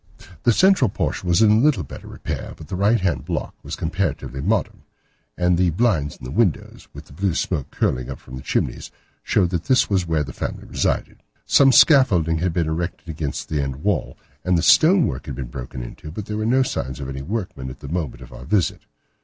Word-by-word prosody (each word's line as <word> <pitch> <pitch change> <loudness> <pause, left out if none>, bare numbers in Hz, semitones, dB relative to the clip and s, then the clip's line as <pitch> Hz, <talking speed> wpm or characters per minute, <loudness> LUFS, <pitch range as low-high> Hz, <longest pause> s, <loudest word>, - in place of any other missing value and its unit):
The 120 - +4
central 185 - +4
portion 95 -1 -2
was 85 +6 +4
in 110 +1 +5
little 135 - +3
better - - -10
repair, - - -6
but 80 - -12
the - - -3
right 105 +5 +3
hand 85 -9 -1
block 85 0 -3
was - - -6
comparatively 80 -6 -2
modern, 105 +1 -1 0.6
and 90 -1 +2
the 90 -1 +3
blinds 80 - 0
in - - -18
the 60 - -6
windows, 100 -3 -1
with - - -11
the - - -16
blue 95 +2 -1
smoke 80 -7 -2
curling 65 0 -1
up 65 - -5
from 65 - -11
the 65 - -7
chimneys, - - -2 0.3
showed 90 -4 +1
that 85 -3 -2
this 130 -5 +3
was 95 -3 +1
where 80 -2 +1
the 70 - -8
family - - -5
resided. - - -2 0.2
Some 135 -1 +6
scaffolding 95 - +5
had 90 +1 0
been 85 -1 0
erected 85 +2 -4
against 75 -3 -4
the 75 -2 -1
end 70 +2 -5
wall, 105 -3 -1 0.3
and 90 -1 +2
the 85 - 0
stone 165 - +6
work 65 - -4
had - - -5
been 65 -3 -6
broken 60 0 -6
into, 70 +5 -9
but 95 +6 -6
there 105 0 -4
were 110 0 -1
no 130 +3 +4
signs 65 - -4
of 70 - -5
any 65 0 -5
workmen 90 - -4
at 65 - -11
the 70 - -8
moment 70 -6 -4
of - - -14
our - - -10
visit. 100 0 +1
85 Hz, 220 wpm, -22 LUFS, 70-105 Hz, 0.6 s, Some